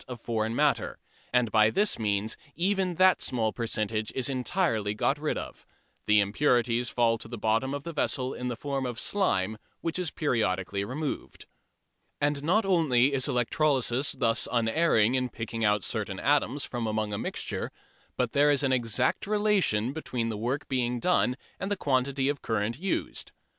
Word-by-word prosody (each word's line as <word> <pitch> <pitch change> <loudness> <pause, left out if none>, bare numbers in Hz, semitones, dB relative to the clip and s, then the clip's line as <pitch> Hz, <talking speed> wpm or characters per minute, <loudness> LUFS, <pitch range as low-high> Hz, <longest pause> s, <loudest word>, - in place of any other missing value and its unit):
of 125 -2 -7
foreign 110 0 -2
matter, - - +1 0.3
and 125 -3 +2
by 110 -1 +5
this 205 - +1
means 105 0 0 0.2
even 185 0 0
that 185 +2 +4
small 110 -4 0
percentage 110 -2 -2
is 130 0 +1
entirely 125 - 0
got 140 +7 0
rid 155 0 -1
of. - - -7 0.4
The 105 0 +5
impurities 120 +2 +1
fall 115 -2 +2
to 110 - -7
the 120 +1 -7
bottom 115 +6 0
of 145 - -6
the 170 - -6
vessel 130 -3 0
in 125 - -5
the 120 - -2
form 135 +1 -3
of 120 -1 -4
"slime," 110 - 0 0.2
which 165 +1 -1
is 180 -3 -1
periodically 100 - -1
removed. 140 +7 -5 0.7
And 145 -1 0
not 195 +8 +2
only 145 -8 +3
is 130 -2 +3
electrolysis 130 +1 +1
thus 115 -4 +1
unerring 115 -1 +3
in 130 -1 0
picking 115 0 -5
out 105 -2 +2
certain 100 -4 -3
atoms 145 +2 +1
from 120 -2 -3
among 110 -1 -1
a 100 - -2
mixture, - - -3 0.5
but - - 0
there 145 +1 +4
is 145 -1 +2
an 135 - +2
exact 125 - +1
relation 200 - +1
between 125 -7 -3
the 110 - -3
work 125 +7 -2
done 125 +2 +1 0.2
and 195 - -3
the 205 - -1
quantity 135 -2 0
of 145 -1 -1
current 115 +2 -2
used. 195 +3 -3
125 Hz, 170 wpm, -28 LUFS, 110-145 Hz, 0.7 s, by